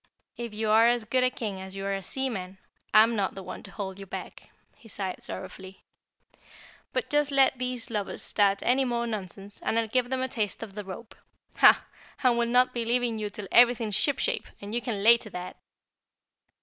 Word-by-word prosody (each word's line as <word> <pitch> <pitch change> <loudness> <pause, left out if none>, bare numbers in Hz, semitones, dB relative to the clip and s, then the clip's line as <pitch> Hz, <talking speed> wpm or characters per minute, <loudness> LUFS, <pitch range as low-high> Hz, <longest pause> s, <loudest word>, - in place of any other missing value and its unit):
"If 235 -1 -6
you're 220 +1 +4
as 240 -2 +1
good 255 +3 +2
a 255 - +4
King 210 -6 -5
as 190 0 -9
you 195 0 -5
are 200 - -1
a 195 - -3
seaman, 195 -4 -3 0.3
I'm 225 +2 +6
not 200 -3 -1
the 195 - -7
one - - -7
to 200 - -12
hold 195 -2 -6
you 195 - -9
back," - - -8 0.3
he 225 - -18
sighed 190 -3 -5
sorrowfully. 190 0 -8 1.1
"But - - -2
just 295 -1 +2
let 270 -2 +3
these 250 -2 -3
lubbers 210 -3 -3
start 200 -1 +2
any 260 +2 +3
more 240 -2 -1
nonsense 200 -2 -5
and 225 - 0
I'll 230 -1 +1
give 245 +2 +1
them 260 0 -1
a - - 0
taste 220 -5 -3
of 210 -3 -9
the 210 +1 -6
rope. 195 +4 -9 0.4
HAH! - - +6 0.4
And 250 -2 +4
we'll 235 0 +1
not 250 +1 +4
be 235 - -1
leaving 235 -1 0
you 210 -1 -2
till 205 -1 -8
everything's 235 -3 +5
shipshape, 285 - 0
and 205 +1 -8
you 240 - 0
can 215 -6 -3
lay 235 +2 +8
to 230 - -11
that!" 180 -1 -7
225 Hz, 200 wpm, -27 LUFS, 195-245 Hz, 1.1 s, lay